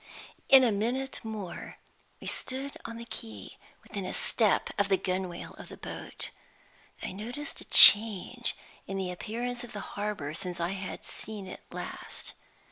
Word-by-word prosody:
In 270 -1 +9
a 240 - +4
minute 245 +6 -2
more 215 -5 -6 0.4
we - - -11
stood 265 +2 -3
on 230 - -6
the 235 - -8
quay, 110 - -8 0.2
within 200 - -5
a 185 - -4
step 220 -4 +2
of 200 -1 +2
the 195 - +4
gunwale 185 -2 -3
of - - -10
the - - -10
boat. - - -4 0.7
I - - -3
noticed 245 +9 -6
a - - -8
change 220 +3 +8 0.3
in 195 - -3
the 185 -2 -2
appearance 240 +6 -4
of 245 - -10
the 205 - -5
harbor 205 -8 -3
since 175 +2 -5
I 170 0 0
had 190 0 -6
seen 215 -3 -5
it 185 - -9
last. - - -7
210 Hz, 160 wpm, -29 LUFS, 185-235 Hz, 0.7 s, In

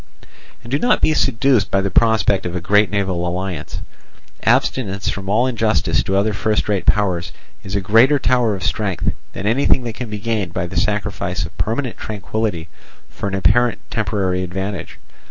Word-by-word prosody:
And 120 - -11
do 140 - +1
not 245 - +3
be 155 - +3
seduced 130 -5 +2
by 95 - +2
the 95 0 -1
prospect 110 -5 +3
of 90 - -5
a - - 0
great 105 +4 +3
naval 95 -4 -1
alliance. 90 -3 -4 0.6
Abstinence 100 -6 +1
from 95 -1 -4
all 110 +5 +3
injustice 115 -4 +1
to 95 - 0
other 105 +2 +1
first 105 +2 0
rate 100 -3 -1
powers 95 -4 +1 0.3
is 95 - -4
a 100 - 0
greater 115 +9 +5
tower 125 -5 +2
of 95 - -7
strength 100 -2 -1 0.2
than 95 - -5
anything 125 +3 +2
that 115 -2 -4
can 120 0 -6
be 105 - -4
gained 105 -5 -2
by 85 - -1
the 90 +2 -8
sacrifice 105 -4 -1
of 85 +2 -11
permanent 120 +3 -2
tranquillity 105 -4 -3 0.4
for - - -5
an 95 - -3
apparent 120 +5 +3
temporary 95 -4 -1
advantage. 95 +2 -5
105 Hz, 175 wpm, -19 LUFS, 95-115 Hz, 0.6 s, greater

